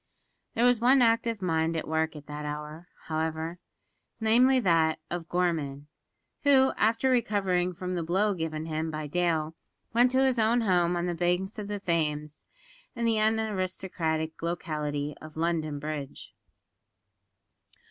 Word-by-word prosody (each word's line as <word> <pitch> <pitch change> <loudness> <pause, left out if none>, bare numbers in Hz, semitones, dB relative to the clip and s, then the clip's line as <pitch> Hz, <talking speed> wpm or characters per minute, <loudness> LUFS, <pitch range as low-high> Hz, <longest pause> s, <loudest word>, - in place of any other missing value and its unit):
There 235 +1 +3
was 245 -2 +4
one 255 +4 +5
active 230 -2 +1
mind 165 -1 +1
at 160 - -4
work 160 0 0
at 150 -1 -10
that 150 +1 -6
hour, 150 +3 -6 0.2
however 160 +2 -3 0.6
namely, 245 +4 +4
that 165 -5 +3
of 170 -1 -4
Gorman 150 -5 -1 0.5
who, 270 -2 +5
after 230 +4 +2
recovering 195 -7 +1
from 180 +1 -4
the 175 - -1
blow 190 +6 +1
given 160 -3 -4
him 160 0 -2
by 155 -1 -4
Dale, 160 0 0 0.4
went 240 +2 +5
to 260 +1 +3
his 255 -3 +2
own 225 +2 +3
home 180 -4 +2
on 175 0 -1
the 175 - -1
banks 180 +4 -1
of 205 - -5
the 205 0 -4
Thames, 150 -4 -2 0.5
in 235 -1 -2
the 225 -1 +2
unaristocratic 185 -7 -1
locality 150 -4 -3
of 155 0 -11
London 160 -3 -1
Bridge. 145 -1 -6
175 Hz, 145 wpm, -28 LUFS, 155-215 Hz, 0.6 s, one